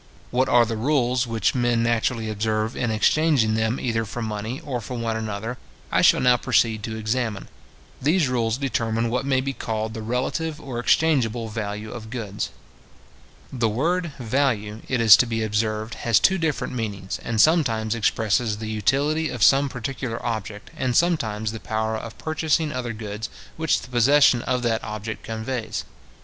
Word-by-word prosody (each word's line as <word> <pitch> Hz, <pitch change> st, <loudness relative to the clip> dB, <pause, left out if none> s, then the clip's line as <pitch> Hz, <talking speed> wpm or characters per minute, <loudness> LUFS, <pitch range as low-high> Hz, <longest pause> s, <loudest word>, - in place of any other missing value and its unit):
What 130 Hz, +1 st, +1 dB
are 120 Hz, -1 st, +5 dB
the 115 Hz, 0 st, -3 dB
rules 125 Hz, -1 st, +1 dB
which 115 Hz, -1 st, +1 dB
men 120 Hz, -2 st, +1 dB
naturally 115 Hz, 0 st, 0 dB
observe, 110 Hz, +1 st, -1 dB
in 120 Hz, -, -1 dB
exchanging 115 Hz, +1 st, +3 dB
them 110 Hz, +3 st, 0 dB
either 115 Hz, -2 st, -1 dB
for 115 Hz, +2 st, -5 dB
money, 110 Hz, +4 st, -4 dB
or 135 Hz, -6 st, -4 dB
for 125 Hz, +3 st, -6 dB
one 115 Hz, -1 st, -2 dB
another, 110 Hz, +2 st, -4 dB, 0.3 s
I -, -, +3 dB
shall -, -, +6 dB
now 125 Hz, -1 st, +5 dB
proceed 115 Hz, -3 st, +1 dB
to 110 Hz, +1 st, -5 dB
examine. 110 Hz, -1 st, -2 dB, 0.5 s
These 155 Hz, +3 st, +3 dB
rules 115 Hz, -2 st, 0 dB
determine 115 Hz, -4 st, -1 dB
what 125 Hz, +3 st, -1 dB
may 130 Hz, -1 st, +2 dB
be 135 Hz, +1 st, -3 dB
called 110 Hz, -3 st, -3 dB
the 110 Hz, -, -5 dB
relative 130 Hz, +7 st, -2 dB
or 130 Hz, -6 st, -5 dB
exchangeable 120 Hz, -5 st, +2 dB
value 105 Hz, 0 st, -5 dB
of 110 Hz, -2 st, -8 dB
goods. 110 Hz, -4 st, -4 dB, 1.0 s
The 120 Hz, -3 st, +1 dB
word 165 Hz, +8 st, 0 dB
VALUE, 110 Hz, -4 st, -1 dB
it 130 Hz, -, +1 dB
is 110 Hz, -3 st, +9 dB
to 125 Hz, -, +2 dB
be 115 Hz, -1 st, -1 dB
observed, 110 Hz, +1 st, -1 dB
has 115 Hz, -2 st, +2 dB
two 190 Hz, -1 st, +3 dB
different 160 Hz, -5 st, -1 dB
meanings, 100 Hz, -5 st, -4 dB
and 115 Hz, -2 st, -2 dB
sometimes 115 Hz, -8 st, +3 dB
expresses 110 Hz, 0 st, +1 dB
the 110 Hz, 0 st, -5 dB
utility 145 Hz, +9 st, +1 dB
of 120 Hz, -4 st, -2 dB
some 140 Hz, +1 st, +5 dB
particular 125 Hz, -1 st, -4 dB
object, 110 Hz, -3 st, -4 dB
and 125 Hz, -2 st, 0 dB
sometimes 110 Hz, -12 st, +1 dB
the 110 Hz, -, -6 dB
power 110 Hz, 0 st, -2 dB
of 110 Hz, +1 st, -7 dB
purchasing 155 Hz, 0 st, 0 dB
other 120 Hz, -2 st, -3 dB
goods 105 Hz, 0 st, -6 dB, 0.3 s
which 160 Hz, 0 st, +1 dB
the -, -, -11 dB
possession 130 Hz, +1 st, +5 dB
of 125 Hz, 0 st, -1 dB
that 115 Hz, -2 st, 0 dB
object 110 Hz, +1 st, -5 dB
conveys. 115 Hz, +1 st, -4 dB
115 Hz, 170 wpm, -24 LUFS, 110-130 Hz, 1.0 s, is